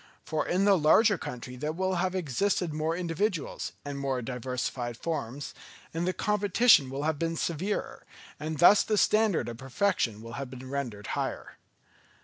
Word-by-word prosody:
For 155 -1 -1
in 185 +3 +2
the 200 -1 +6
larger 205 +8 +5
country 125 +1 -7
there 150 +5 -3
will 185 +3 -1
have 185 +1 0
existed 180 +1 0
more 155 +2 -1
individuals, 175 -1 -2
and 140 -1 -4
more 135 -2 -1
diversified 125 -1 -3
forms, 140 -4 -4 0.4
and 165 +2 -1
the - - +3
competition 205 - +4
will 135 +2 -4
have 155 -1 0
been 165 0 -1
severer, 175 +6 -3 0.4
and 155 +1 -4
thus 185 +6 +7
the 215 - 0
standard 215 -3 +3
of 115 -1 -6
perfection 130 - -1
will 115 0 -9
have 135 - -5
been 130 0 -9
rendered 120 -8 -4
higher. - - -4
155 Hz, 160 wpm, -29 LUFS, 130-185 Hz, 0.4 s, thus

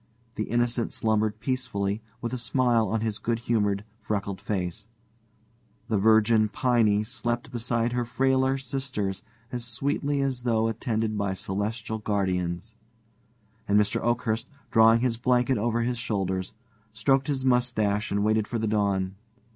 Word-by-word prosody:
The 110 - -2
Innocent 120 0 0
slumbered 110 -1 0
peacefully, 110 -5 -2 0.2
with 120 +1 -3
a - - -1
smile 120 -2 +2
on 115 -1 0
his 110 -1 -2
good 115 0 0
humored, 105 -3 0
freckled 100 -3 -3
face; 100 0 -3 1.0
the 110 - +2
virgin 110 +1 +4
Piney 110 -4 +2
slept 120 +2 -3
beside 120 -1 -1
her 120 0 +1
frailer 130 +2 +2
sisters 130 -7 -3 0.3
as 120 -1 -3
sweetly 140 +4 -1
as 130 -2 -1
though 115 -2 +1
attended 110 -1 -1
by 100 -2 -1
celestial 105 +4 -3
guardians; 95 -1 -1 0.9
and 100 +1 +4
Mr. 105 -1 +1
Oakhurst, 115 0 0 0.2
drawing 115 0 +6
his 120 -2 +1
blanket 125 0 +2
over 115 +1 +1
his 120 0 -1
shoulders, 95 -5 -2 0.4
stroked 135 +5 +2
his 135 -3 -1
mustaches 115 -5 +1
and 100 0 0
waited 110 0 +2
for 120 - -2
the 110 0 -1
dawn. 100 -3 +1
110 Hz, 140 wpm, -27 LUFS, 105-120 Hz, 1.0 s, drawing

